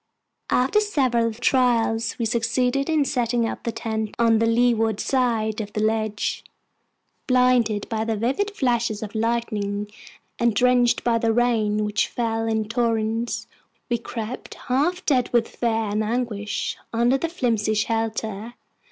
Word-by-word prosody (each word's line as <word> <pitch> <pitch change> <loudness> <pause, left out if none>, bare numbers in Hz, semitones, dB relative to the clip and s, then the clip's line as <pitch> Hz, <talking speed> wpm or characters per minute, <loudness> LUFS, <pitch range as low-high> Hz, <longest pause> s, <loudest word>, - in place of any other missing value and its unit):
After 265 +11 +3
several 255 - +1
trials, 230 -1 +1
we 235 - -1
succeeded 245 +5 0
in 310 -3 +2
setting 240 -3 0
up - - -5
the 235 - -2
tent 220 -1 -3
on 230 -1 +4
the 230 - +2
leeward 225 -2 +2
side 230 -4 0
of 205 -1 -7
the - - -2
ledge. 215 -1 -1 0.8
Blinded 250 -5 +3
by 220 -2 -2
the 225 -1 -1
vivid 265 - 0
flashes 235 - 0
of 210 - -7
lightning, 215 -3 -2 0.5
and 235 -2 +2
drenched 245 +1 +3
by 230 -1 +2
the 230 0 +2
rain, 220 -3 +1
which 210 0 0
fell 225 -1 -2
in 220 -1 0
torrents, 230 0 -1 0.5
we 235 - +1
crept, 230 +1 -6
half 305 +9 -1
dead 255 -5 +2
with 235 -2 +2
fear 240 - -2 0.2
and 215 +1 0
anguish, 215 -2 -2
under 240 +3 +2
our 330 - -1
flimsy 225 -9 0
shelter. 220 0 -2
230 Hz, 145 wpm, -23 LUFS, 220-245 Hz, 0.8 s, on